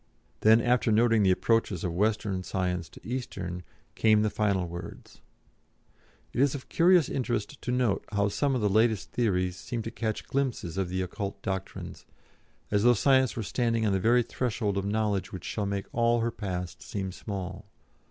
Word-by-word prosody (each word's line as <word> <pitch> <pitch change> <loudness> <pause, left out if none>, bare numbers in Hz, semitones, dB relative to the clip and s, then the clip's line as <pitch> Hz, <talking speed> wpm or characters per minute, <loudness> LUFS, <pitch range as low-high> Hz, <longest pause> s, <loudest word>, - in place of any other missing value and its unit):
Then 110 +2 +6
after 120 -1 +2
noting 115 0 +4
the 95 - +4
approaches 100 -1 +1
of 85 - -1
Western 105 0 0
Science 90 -2 -2
to - - -14
Eastern, 95 -8 -4 0.3
came 110 -1 +4
the 105 - +1
final 100 -4 +1
words: 85 +1 -9 1.1
"it - - +1
is 140 0 +3
of 135 - -8
curious 175 -1 +5
interest 120 0 -3
to 125 - -3
note 125 -5 +1
how 100 -1 +2
some 140 +5 0
of 125 - -1
the 105 - +3
latest 110 -1 +2
theories 90 -6 0
seem 115 +2 -4
to 115 - -5
catch 110 -2 -3
glimpses 130 -11 -2
of 95 -2 -1
the 95 +1 -1
occult 100 +2 -5
Doctrines, 95 -1 -5 0.6
as 105 -1 +3
though 120 +2 +5
Science 130 +1 +3
were 115 - -3
standing 115 0 0
on 100 - +2
the 95 - +2
very 120 +5 +4
threshold 115 -4 -2
of 100 0 -1
knowledge 105 -2 0
which 90 -2 -7
shall 105 -2 -2
make 100 -1 -2
all 120 0 +2
her 115 +1 0
past 90 -5 -5
seem 95 -2 -4
small. 95 0 -6
105 Hz, 180 wpm, -28 LUFS, 95-120 Hz, 1.1 s, Then